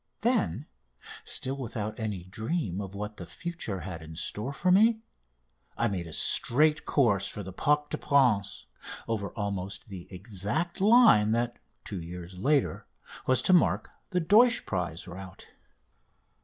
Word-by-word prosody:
Then 215 - +1 0.6
still 135 +2 -2
without 110 -4 -5
any 105 -5 -3
dream 110 - -3
of 100 0 -7
what 105 +1 -5
the - - -8
future 165 - -5
had 85 -2 -6
in 80 0 -10
store 105 - -3
for 180 +6 +1
me 220 +4 +4 0.7
I 115 - +2
made 90 -4 -3
a - - -9
straight 150 - +3
course 100 -9 +2
for 105 - -5
the 95 0 -8
Parc 150 +7 +1
des - - -1
Princes, 115 -9 +2 0.4
over 105 -3 -2
almost 100 -1 -4
the 95 -3 -8
exact 105 - -2
line 205 - +6
that, 120 +1 -1 0.3
two 95 -4 -5
years 90 +2 -8
later, 140 +6 +1 0.4
was 130 -1 +3
to 185 - +4
mark 175 - +3 0.2
the 180 - +1
Deutsch 220 +8 +4
prize 90 -3 -3
route. 95 +2 -10
105 Hz, 145 wpm, -28 LUFS, 95-150 Hz, 0.7 s, line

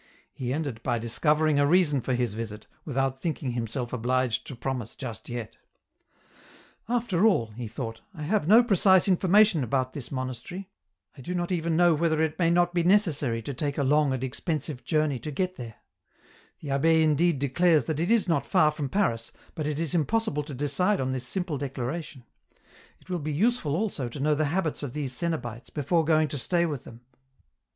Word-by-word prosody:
He 125 -2 -4
ended 140 -6 -3
by 120 -1 0
discovering 150 +6 +2
a 145 - +4
reason 150 -5 +3
for 130 +2 -1
his 120 -4 -1
visit, 105 -1 -6 0.2
without 135 -2 -1
thinking 150 -6 -2
himself 120 +1 -4
obliged 125 0 0
to 135 - -7
promise 125 -2 -4
just 120 -6 -7
yet. 120 -2 -6 0.7
" - - -26
After 230 -7 0
all," 120 - +3
he 115 +2 -6
thought, 115 0 -6
" - - -42
I 155 - -6
have 180 0 0
no 225 +5 +7
precise 190 -4 +4
information 190 -2 +4
bout 130 -1 0
this 140 -5 -7
monastery; 130 +9 -5 0.4
I - - -11
do 180 +7 -4
not 175 +1 -2
even 165 -2 0
know 175 -1 +5
whether 160 0 +1
it 160 0 0
may 170 -2 +3
not 175 +1 +2
be 175 - +2
necessary 160 - +2
to 140 - -4
take 140 +2 -3
a 140 - +1
long 145 +1 +3
and 130 -1 -2
expensive 150 0 -3
journey 150 -1 0
to 155 - -6
get 185 +5 -2
there; 115 -4 -8 0.9
the 145 - -7
abbd 160 +4 +3
indeed 155 +1 +3
declares 155 +4 +3
that 155 -2 -2
it 170 +3 0
is 230 -3 +3
not 165 - +1
far 155 -5 +3
from 150 -2 -4
Paris, 115 - 0 0.2
but 155 -2 -3
it 150 -1 -2
is 165 -1 -1
impossible 175 0 0
to 145 -3 -7
decide 145 +9 +1
on 130 0 -1
this 130 -1 -3
simple 175 -5 -2
declara 135 +3 -3
tion; 140 -4 -13 0.8
it - - -25
will 180 -1 -2
be 155 0 -3
useful 170 - +1
also 170 - -2
to 130 - -8
know 150 +2 +2
the 155 +1 +1
habits 160 +1 -1
of 140 -4 -5
these 140 -4 -3
cenobites 120 -8 -4
before 160 +3 +1
going 155 0 +3
to 145 - -4
stay 170 +6 +1
with 145 -6 -4
them." 115 0 -12
150 Hz, 200 wpm, -27 LUFS, 130-170 Hz, 0.9 s, no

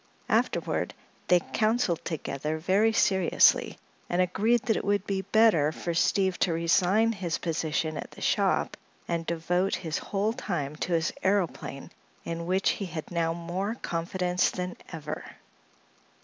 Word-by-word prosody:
Afterward - - 0 0.3
they 180 -1 +5
counseled 215 -6 +1
together 155 -1 -3
very 195 +7 +3
seriously 190 -5 +3 0.3
and 175 - 0
agreed 210 +6 +2
that 230 -3 +1
it - - -2
would 200 -1 +1
be 195 -1 -1
better 200 -7 +4
for 170 +2 -4
Steve 190 +2 +2
to 175 - +2
resign 185 +7 +3
his 180 -7 -2
position 160 -1 -2
at - - -6
the - - -14
shop - - +1 0.3
and 170 -1 -2
devote 180 +3 0
his 160 -3 -3
whole 205 +2 -1
time 155 - -3
to 175 - -2
his 165 0 +1
aëroplane, 185 -8 -1 0.3
in 170 0 -4
which 190 +1 +2
he 200 - -4
had 160 -2 -6
now 165 -1 0
more 180 +6 -3
confidence 180 0 0
than 180 -1 -4 0.2
ever. 155 -3 -5
180 Hz, 145 wpm, -28 LUFS, 165-195 Hz, 0.3 s, they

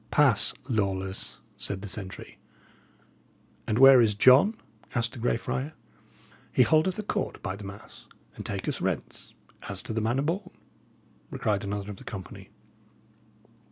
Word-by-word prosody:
"Pass, 135 -8 +4
Lawless," 95 -5 -1 0.2
said 100 -1 -3
the - - -5
sentry. 95 -1 -6 1.3
"And 110 - 0
where 135 -1 +9
is 105 -3 +2
John?" 130 - +6 0.4
asked 115 -1 0
the 125 - -8
Grey 115 0 +1
Friar. 135 +6 -3 0.8
"He 125 - +5
holdeth 155 +9 +2
a 215 - -3
court, 205 -1 -3
by 95 - -3
the 100 0 -9
mass, 100 +1 -11 0.3
and - - -7
taketh - - -3
rents - - -4 0.3
as - - -4
to - - -5
the 110 - -1
manner 120 +5 0
born!" 180 +5 -2 0.9
cried 105 -2 0
another 100 0 -4
of 100 - -9
the - - -12
company. 95 -4 -9
115 Hz, 145 wpm, -27 LUFS, 100-135 Hz, 1.3 s, where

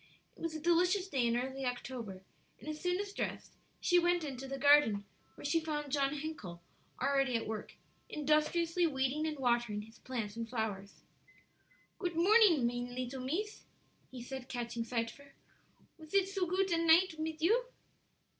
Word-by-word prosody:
It - - -17
was 330 -1 -3
a - - -3
delicious 360 +4 +3
day 260 -9 +1
in 235 0 +2
early 265 +2 -3
October, 245 -6 -4 0.4
and - - -13
as 305 0 -5
soon 360 0 0
as 405 0 -4
dressed - - -4 0.3
she 355 -1 +4
went 350 0 +2
into 270 -2 -5
the 275 +1 -4
garden, 270 -8 +5 0.3
where - - -10
she 330 +3 +3
found 300 -3 -3
John 280 0 +1
Hencle 280 - -6 0.4
already 275 -1 +2
at 230 - 0
work, 220 -1 -5 0.3
industriously 320 +3 +2
weeding 275 +2 0
and 305 -1 -3
watering 240 -5 +1
his 225 +2 -16
plants 225 -5 -4
and 230 0 -4
flowers. 210 -4 -4 1.0
"Goot 350 -3 -2
morning, 360 - +6
mine 245 +1 -2
leetle 255 +1 -4
mees," 395 - -3 0.4
he 250 -2 -8
said, 265 0 -7
catching 235 -1 -3
sight 230 0 -2
of - - -16
her, 280 -1 -17 0.6
"Was 315 +4 -8
it 390 -1 +4
so 390 -2 -1
goot 375 +2 +1
a 335 0 +2
night 330 0 +5
mit 315 0 -3
you?" 445 +10 +3
280 Hz, 175 wpm, -34 LUFS, 245-335 Hz, 1.0 s, morning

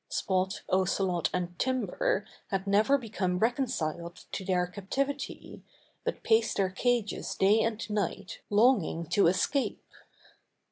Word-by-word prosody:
Spot, 190 0 -1
Ocelot 185 -1 +1
and 175 -1 -3
Timber 260 - 0 0.2
had 195 -1 -2
never 210 +8 +4
become 200 -7 -2
reconciled 180 - -1
to - - -4
their 180 -1 +1
captivity, 270 +10 -4 0.4
but 485 - -3
paced 225 0 +3
their 195 -2 +1
cages 235 +1 -1
day 200 +3 +4
and 225 0 -1
night 200 -2 -3
longing 205 -6 +3
to 200 - +4
escape. 185 +10 0
200 Hz, 120 wpm, -29 LUFS, 185-240 Hz, 0.4 s, never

